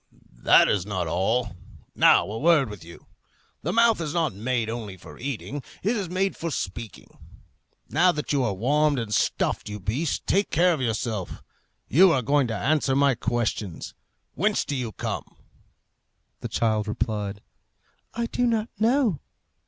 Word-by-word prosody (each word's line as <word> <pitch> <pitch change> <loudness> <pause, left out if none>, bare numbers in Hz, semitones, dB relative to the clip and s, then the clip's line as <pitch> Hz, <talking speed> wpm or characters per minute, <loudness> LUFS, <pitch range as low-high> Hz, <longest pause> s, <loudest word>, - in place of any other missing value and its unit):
"That - - +6
is 100 -4 +1
not 95 -3 -3
all. 95 +7 0 0.4
Now, - - +5
a 105 +4 -5
word 150 -7 +3
with 105 -6 -10
you. 85 +1 -13 0.6
The 165 - -2
mouth 230 -2 +4
is 155 0 -4
not 160 -4 +1
made 115 +3 -1
only 110 -4 -5
for 85 - -13
eating; 140 +2 -5 0.2
it 215 +6 +1
is 200 -6 -3
made 190 +2 0
for 170 - -4
speaking. 110 - -6 0.7
Now 175 +8 +4
that 150 -4 -3
you 140 -2 +2
are 105 -5 -1
warmed 145 +7 +2
and 115 -3 -3
stuffed, 105 - 0
you 105 0 -6
beast, 125 - -2
take 200 +2 +1
care 175 +2 +3
of 150 - -3
yourself. 110 -5 -3 0.4
You 185 +5 +6
are 130 - +1
going 140 +1 +2
to 115 - -3
answer 140 +3 +1
my 140 0 +4
questions. 115 -6 -3 0.4
Whence 210 +7 +1
do 145 - -3
you 125 -4 -3
come?" - - -5 1.0
The - - -5
child 110 -2 0
replied, 105 -2 -3 0.7
"I 235 0 -1
do 245 +1 0
not 225 -1 0
know." 230 - +2
130 Hz, 160 wpm, -25 LUFS, 105-170 Hz, 1.0 s, That